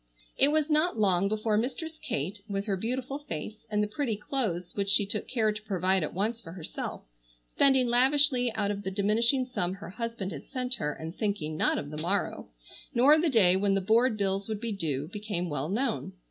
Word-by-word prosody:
It 275 - +5
was 305 0 +2
not 310 -1 +2
long 195 -3 +3
before 215 +1 0
Mistress 315 +7 -4
Kate, 180 +9 -3
with 200 0 -2
her 200 -3 0
beautiful 255 +7 -3
face, 215 - -7
and 210 -1 +1
the - - 0
pretty 225 +1 -2
clothes 210 -7 -2
which 200 -1 -1
she 205 0 +4
took 205 +1 -3
care 225 -4 +1
to 210 +1 -6
provide 190 -2 +1
at 155 - -2
once 220 +5 -1
for 165 - -10
herself, 175 -4 -6 0.4
spending 265 - +3
lavishly 255 +1 +3
out 205 -2 0
of 200 0 -4
the 190 - -3
diminishing 225 +7 +2
sum 185 -8 -2
her 195 -2 -9
husband 230 -3 -4
had 145 -4 -8
sent 255 -2 -2
her, 210 -11 -1
and 160 +3 -7
thinking 200 -8 -2
not - - +2
of 145 - -5
the 155 0 -4
morrow, 190 +5 -1 0.5
nor 280 +6 +6
the 335 - +2
day 195 -9 +5
when 195 +1 +2
the - - +3
board 225 +4 +3
bills 195 0 -1
would 215 -2 -2
be 230 0 -3
due, 150 -8 -2
became 200 -5 -3
well 145 +1 -2
known. 230 +4 -1
210 Hz, 205 wpm, -29 LUFS, 190-245 Hz, 0.5 s, nor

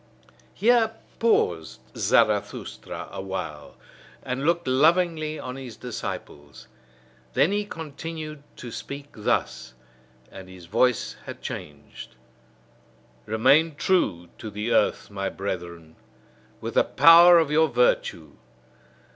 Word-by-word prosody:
Here 225 +1 +3 0.2
paused 85 - +1 0.2
Zarathustra - - 0
awhile, 95 -7 -6 0.5
and 130 +2 -3
looked 170 -3 +1
lovingly 155 +3 +2
on 125 -2 -7
his 125 -4 -9
disciples. 75 -11 -7 0.7
Then 160 - +3
he 205 0 -1
continued 155 -3 -7
to 120 - -9
speak 140 +3 -8
thus 65 - -2 0.6
and 95 -1 -11
his 90 -2 -13
voice 115 +6 +1
had - - -9
changed: 75 0 -9 1.1
Remain 135 +9 +3
true 115 - 0
to 110 - -6
the 105 +3 -4
earth, - - +1
my 95 -1 -3
brethren, 85 -4 -6 0.7
with - - -5
the - - +4
power 170 +1 +7
of 160 -3 +2
your 160 +1 +4
virtue! - - 0
130 Hz, 105 wpm, -25 LUFS, -, 1.1 s, power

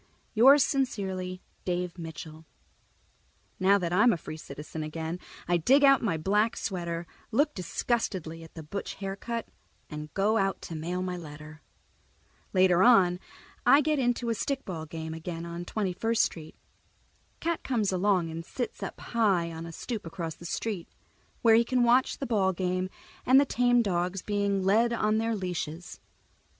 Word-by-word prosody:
_ - - -34 0.3
Yours 265 +5 +7
sincerely, 190 -9 -2 0.2
Dave 180 0 -2
Mitchell 160 -1 -8 1.1
Now 195 +2 +5
that 175 -3 -2
I'm 215 +6 +5
a 180 - 0
free 155 - -8
citizen 155 +1 -8
again, 160 +3 -4 0.3
I 175 0 +3
dig 270 - +4
out 275 -1 +6
my 185 -8 0
black 210 +7 +1
sweater, 170 -3 -3 0.2
look 290 +6 +2
disgustedly 180 -3 -2
at 165 - -15
the 160 - -7
butch 200 +7 -5
haircut, 200 +4 -4 0.4
and 150 0 -6
go 210 +3 +2
out 195 -1 0
to 165 - -6
mail 175 +4 -3
my 180 -1 -3
letter. 155 -1 -10 0.9
Later 185 -2 +4
on 190 -6 +5 0.4
I 285 - +6
get 305 0 +1
into 240 -2 0
a - - +2
stickball 190 - -4
game 160 -1 -5
again 165 +1 -6
on 170 +1 -6
Twenty 195 -1 -2
first 225 +4 +2
Street. 160 -2 -5 0.8
Cat 335 0 -1
comes 220 -7 0
along 185 -3 +1
and 165 +1 -5
sits 245 +8 -5
up - - -5
high 195 -8 +1
on 165 +1 -7
a - - -7
stoop 210 +3 -5
across 165 -2 -4
the 170 - -9
street, 200 -2 -3 0.6
where 225 -1 +7
he 230 +1 +6
can 250 +1 +1
watch 245 +2 +3
the 275 - -4
ball 200 -6 +2
game 185 +1 -1 0.3
and 260 +2 +6
the 285 - +4
tame 245 -2 +3
dogs 180 -1 -1
being 200 -2 0
led 220 +5 +4
by 235 - -1
on 215 0 +2
their 225 0 0
leashes. 180 -3 -5
185 Hz, 165 wpm, -28 LUFS, 170-230 Hz, 1.1 s, Yours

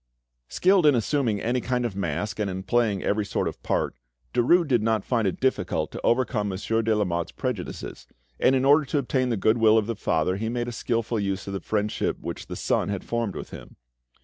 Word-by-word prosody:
Skilled 185 -3 +3
in 145 - +6
assuming 120 -2 0
any 120 +4 0
kind 125 0 -1
of 110 -5 -3
mask 95 +3 -3
and 105 -2 0
in 95 0 -5
playing 110 -3 +1
every 105 +1 +1
sort - - -1
of - - -6
part, - - -1 0.4
Derues 170 +8 +4
did 125 -5 +2
not 110 -2 0
find 115 -5 +1
it 95 - -2
difficult 90 - 0
to - - -7
overcome 120 -4 +1
Monsieur 110 +4 -1
de 110 -1 +1
Lamotte's 85 -5 -1
prejudices, 125 -9 -5 0.3
and 135 - +4
in 130 0 +1
order 145 +3 +6
to 145 +2 -2
obtain 130 -1 0
the 115 - 0
goodwill 110 +2 +4
of 110 - +2
the 115 +1 -3
father 90 -1 0
he 110 +2 -2
made 120 0 -2
a - - -3
skilful 115 -1 -1
use 100 -1 -2
of 100 - -5
the 95 - -2
friendship 105 -1 -1
which - - -6
the, - - -6
son - - 0
had 100 -2 -3
formed 115 -4 -2
with - - -7
him. - - -11
110 Hz, 215 wpm, -25 LUFS, 100-125 Hz, 0.4 s, in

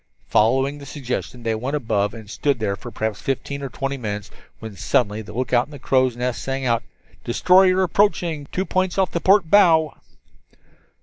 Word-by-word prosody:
Following 135 +6 +2
the 140 - -11
suggestion 125 -3 -5
they 115 -1 0
went 125 +6 -3
above 110 -6 -1
and 115 - -9
had 105 - -13
stood 140 -2 0
there 105 -3 -1
for 120 - -9
perhaps 110 -3 -3
fifteen 140 +1 -3
or 135 - -4
twenty 135 +2 -3
minutes 105 -5 -5 0.3
when 110 -2 -9
suddenly 105 +1 0
the 105 - -11
lookout 120 +2 +1
in - - -18
the 145 - -9
crow's 130 -2 +1
nest 125 0 -2
sang 135 0 -3
out: 115 -2 +1 0.4
"Destroyer 185 +8 +4
approaching, 175 -6 +1
two 185 - -1
points 185 -1 -1
off 190 -3 +1
the 170 - -2
port 190 -4 +3
bow." 165 -7 +5
135 Hz, 185 wpm, -22 LUFS, 115-160 Hz, 0.4 s, bow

